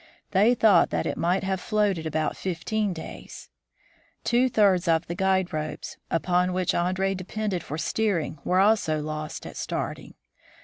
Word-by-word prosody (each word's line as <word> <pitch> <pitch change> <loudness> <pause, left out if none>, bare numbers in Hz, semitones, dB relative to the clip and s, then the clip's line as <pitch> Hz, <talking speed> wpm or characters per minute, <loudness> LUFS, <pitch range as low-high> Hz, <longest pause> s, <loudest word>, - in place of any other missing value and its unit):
They 210 +5 +4
thought 210 -7 +5
that - - -1
it - - -1
might 180 +3 0
have 190 -1 -1
floated 205 -7 0
about 155 0 -1
fifteen 195 +4 -2
days. 160 -3 -9 0.7
Two 245 +2 +3
thirds 195 -6 +3
of 165 0 +2
the 170 - -4
guide 190 -1 +1
ropes, 155 0 -4
upon 180 +2 +1
which 185 -1 0
Andree 185 +2 0
depended 195 0 -3
for 155 - -5
steering, 170 -3 -1
were 180 +1 +2
also 195 -6 +3
lost 155 0 -5
at - - -8
starting. - - -4
185 Hz, 150 wpm, -26 LUFS, 165-200 Hz, 0.7 s, thought